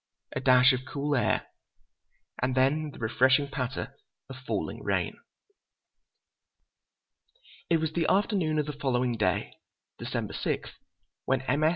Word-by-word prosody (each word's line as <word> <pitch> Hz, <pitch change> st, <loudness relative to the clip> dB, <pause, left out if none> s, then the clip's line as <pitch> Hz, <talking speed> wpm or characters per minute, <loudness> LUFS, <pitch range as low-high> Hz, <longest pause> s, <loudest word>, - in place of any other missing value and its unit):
A -, -, 0 dB
dash 125 Hz, 0 st, +6 dB
of 130 Hz, -, 0 dB
cool 145 Hz, +1 st, -2 dB
air, 125 Hz, -, +1 dB, 1.0 s
and 130 Hz, 0 st, 0 dB
then 145 Hz, +4 st, +2 dB
the -, -, -12 dB
refreshing 130 Hz, +5 st, +3 dB
patter 135 Hz, -2 st, -4 dB, 0.4 s
of 130 Hz, -, -8 dB
falling 130 Hz, -, -4 dB
rain. -, -, -1 dB, 2.5 s
It 165 Hz, -, +4 dB
was 160 Hz, -1 st, -2 dB
the 165 Hz, -1 st, +1 dB
afternoon 190 Hz, -6 st, +2 dB
of 150 Hz, -, +1 dB
the 150 Hz, -, -4 dB
following 125 Hz, -3 st, 0 dB
day, 105 Hz, -1 st, -1 dB, 0.4 s
December -, -, -3 dB
6, -, -, -2 dB, 0.5 s
when 130 Hz, -1 st, +1 dB
M. 145 Hz, +3 st, 0 dB
S. 155 Hz, -, +6 dB
135 Hz, 135 wpm, -28 LUFS, 130-155 Hz, 2.5 s, dash